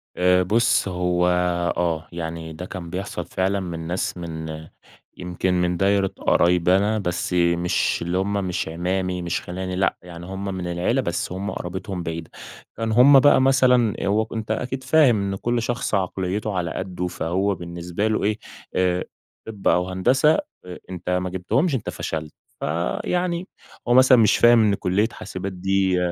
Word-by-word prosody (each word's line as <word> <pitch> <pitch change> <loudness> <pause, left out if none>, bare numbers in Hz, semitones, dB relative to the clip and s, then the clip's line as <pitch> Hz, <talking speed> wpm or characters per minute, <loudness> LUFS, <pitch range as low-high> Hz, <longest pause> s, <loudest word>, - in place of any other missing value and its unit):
آآ 90 0 +3
بُُص 115 +4 +2
هو 90 -1 0 0.5
آه، 80 -2 -1
يعني 80 -1 -5
ده 85 +3 -7
كان 90 -2 -7
بيحصل 95 +4 -5
فعلًا 95 +1 -1
من 85 -3 -5
ناس 90 +1 -2
من 80 -2 -6 0.5
يمكن 90 +1 -2
من 90 0 +1
دايرة 100 +1 +2
قرايبي 90 +1 +3
أنا 105 +2 +1
بس 90 -1 -2
مش 85 0 +1
اللي 85 +2 -1
هم 100 +2 -1
مش 90 -1 -2
أعمامي 90 +2 -2
مش 85 -1 -2
خيلاني 90 +1 -5
لأ، 95 +1 +1
يعني 85 -1 -10
هم 95 +2 -6
من 90 -1 -4
العيلة 90 +9 0
بس 85 -7 -3
هم 95 +2 -4
قرابتهم 95 +1 -5
بعيدة. 80 0 -5 0.5
كانوا 110 -1 -1
هم 140 +1 +8
بقى 145 -1 +5
مثلًا، 125 -4 +4
هو 110 +2 +1
أنتَ 110 -1 -4
أكيد 125 +4 -3
فاهم 130 -6 +4
إن - - -2
كل 120 +4 -1
شخص 120 -1 -1
عقليته 95 +2 -2
على 85 -2 -2
قدّه 90 -1 -4
فهو 95 +4 -1
بالنسبة 85 +3 -4
له 110 - 0
إيه 105 +1 +1 0.4
آآ، 90 -1 +1 0.4
طِب 105 -3 -4
أو 90 +1 +2
هندسة 130 +11 +3 0.3
أ 90 -1 -8
أنتَ 90 -1 -6
ما 90 0 0
جيبتهمش 130 - 0
أنتَ 120 - -3
فشلت، 80 -1 -5 0.3
فيعني 170 - -2 0.4
هو 120 - +3
مثلًا 130 0 +7
مش 110 -3 +4
فاهم 120 -1 +6
إن 105 -2 +3
كلية 100 +4 +1
حاسبات 95 +1 -6
دي 95 0 +1
95 Hz, 165 wpm, -23 LUFS, 90-110 Hz, 0.5 s, هم